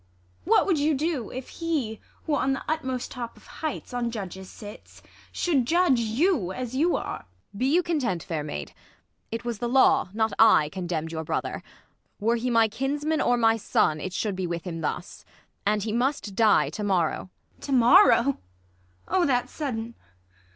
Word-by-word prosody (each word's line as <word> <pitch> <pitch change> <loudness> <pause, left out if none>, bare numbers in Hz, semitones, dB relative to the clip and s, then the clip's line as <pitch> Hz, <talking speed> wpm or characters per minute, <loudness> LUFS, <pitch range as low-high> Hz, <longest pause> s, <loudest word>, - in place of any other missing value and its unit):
What - - +4
would 355 -6 +1
you 300 +1 +2
do 290 -5 -2
If 255 0 -7
he, 295 -10 -2 0.2
who 315 - -2
on 270 -1 +1
the 270 - -4
utmost 260 -5 -2
top 240 -2 -6
of - - -18
heights, 310 -4 -6
On 240 -1 -1
judges 190 -4 -7
sits, 210 +1 -12 0.3
should 280 -9 +1
judge 340 -6 +3
you 230 - +1
as 250 +3 -5
you 330 +6 +2
are? - - -3 0.4
Ang. 200 - -10
Be 255 - +2
you 355 +3 +4
content, 255 - -1
fair 160 -3 -3
maid, 75 - -6 0.6
It 230 +1 -4
was 235 -3 -3
the 240 - -2
law, 270 -3 +4
not 220 +1 0
I, 215 -9 +6
condemn'd 170 -3 -4
your 160 -1 -4
brother: - - -3 0.6
Were 225 +3 +2
he 245 +2 -2
my 230 -2 +4
kinsman 290 +7 -1
or 245 - +2
my 225 -1 +3
son, 155 -7 +1
it 185 - -4
should 200 +2 -2
Be 185 -1 -2
with 170 -1 -4
him 165 -3 -5
thus. 155 - -4 0.4
And 210 -1 +2
he 220 - -2
must 245 -3 -1
die 215 +1 +3
to 210 - -5
morrow. 185 -2 0 0.3
ISAB. - - -9
To - - -4
morrow 265 - +6
1 280 -1 0 0.7
Oh, 370 -2 +3
that's 250 -2 0
sudden 235 -6 -4
235 Hz, 185 wpm, -26 LUFS, 205-275 Hz, 0.7 s, I